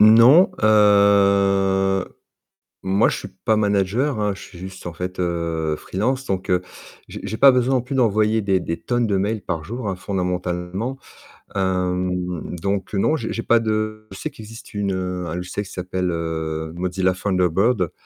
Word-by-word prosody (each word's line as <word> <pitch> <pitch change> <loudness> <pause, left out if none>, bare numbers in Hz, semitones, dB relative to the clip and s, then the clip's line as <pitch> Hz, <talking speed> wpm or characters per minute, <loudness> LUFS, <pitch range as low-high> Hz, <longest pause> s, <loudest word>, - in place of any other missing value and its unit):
Non, 115 - +7
heu, 100 -2 +4 0.8
moi 95 +1 +3
je - - -2
suis - - -7 0.2
pas 110 - +3
manager 105 +6 +1
hein, 105 -1 0
je - - -12
suis 90 - -12
juste, 95 +1 -9
en 85 - -5
fait, 90 +2 -5
heu, 85 -3 -1
freelance, 130 - -2
donc 95 -4 -3
heu, 90 0 +3 0.5
j'ai - - -8
j'ai 110 - -4
pas 140 +2 +8
besoin 125 +1 +2
non 125 - +2
plus 130 +3 -5
d'envoyer 110 -2 +2
des 95 -2 +1
des 85 -1 -4
tonnes 120 -1 0
de 100 -2 +1
mails 105 +3 -1
par 80 -2 -3
jour, 115 +4 -5
hein, 95 - -2
fondamentalement. 90 +4 -3 0.6
Hem, 90 -2 -1
donc 100 +3 -2
non, 105 +10 +2
j'ai 115 -8 -4
j'ai 115 - -3
pas 115 - +4
de 110 -1 -2
je 95 - -9
sais - - -4
qu'il 110 - -12
existe 115 +3 -12
une, 100 -2 -1
heu 90 -1 -3
un 80 - -4
logiciel 90 +3 -4
qui - - -12
s'appelle 90 0 -3
heu, 80 -1 -3
Mozilla 90 +1 0
Thunderbird. 95 +1 +1
95 Hz, 175 wpm, -21 LUFS, 90-110 Hz, 0.8 s, pas